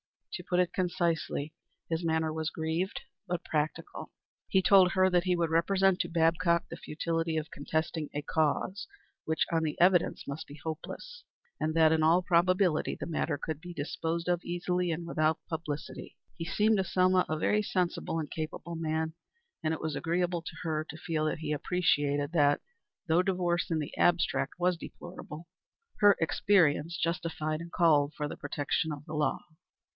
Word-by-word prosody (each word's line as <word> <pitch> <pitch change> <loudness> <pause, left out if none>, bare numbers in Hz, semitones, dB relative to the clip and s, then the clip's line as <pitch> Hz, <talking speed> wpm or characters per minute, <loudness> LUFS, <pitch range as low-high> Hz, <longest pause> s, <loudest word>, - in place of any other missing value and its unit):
To - - -6
put 180 -1 0
it 180 -1 +1
concisely, 170 -4 -1 0.4
his 165 +1 -1
manner 160 -1 0
was 160 0 -2
grieved, 160 +4 -2 0.3
but 175 -1 -2
practical. 155 0 -3 0.4
He 190 - +3
told 185 -3 +6
her 185 0 +4
that 175 0 +3
he 180 -1 +2
would 170 -2 0
represent 190 +3 +3
to - - -1
Babcock 170 +1 +2
the 165 - -7
futility 165 +1 -2
of 155 0 -3
contesting 160 +1 -2
a 145 - -2
cause, 160 +6 0 0.4
which, 160 0 +1
on 165 -1 +2
the 155 -2 -2
evidence, 180 -1 +3
must 140 +3 -5
be 145 +1 -11
hopeless, 475 - -7 0.4
and 155 +1 -1
that, 160 -1 +6
in 160 0 +3
all 165 +3 +4
probability, 180 -1 +2
the - - -6
matter 160 -3 -1
could 155 +1 -5
be 175 0 -9
disposed 165 +3 -3
of 175 -1 +1
easily 175 +1 -1
and 165 +1 -2
without 160 -2 +1
publicity. 160 -3 -5 0.2
He 165 - -5
seemed 210 +5 +2
to 190 - +2
Selma 185 0 +3
a 155 - 0
very 210 +6 +2
sensible 180 -4 -1
and 155 -3 -4
capable 160 +2 -5
man, 160 0 -1 0.5
and 155 - 0
it 160 - -3
was 155 -2 -2
agreeable 175 +1 0
to 165 0 -8
her 155 -2 -1
to 155 - -7
feel 155 -1 -2
that 155 - -1
he 155 -1 -3
appreciated 145 -3 +1
that, 145 -4 +3 0.4
though 170 +1 +3
divorce 180 -1 0
in 165 - +1
the 150 -2 -4
abstract 175 0 +2
was 180 0 +1
deplorable, 170 -2 -9 0.5
her 205 -1 +7
experience 165 -2 +2
justified 165 -2 -2
and 170 0 -9
called 155 -4 +3
for 150 - -2
the - - -7
protection 145 +2 -1
of 145 0 -7
the 155 - -8
law. 150 -1 +1
165 Hz, 175 wpm, -30 LUFS, 155-180 Hz, 0.5 s, her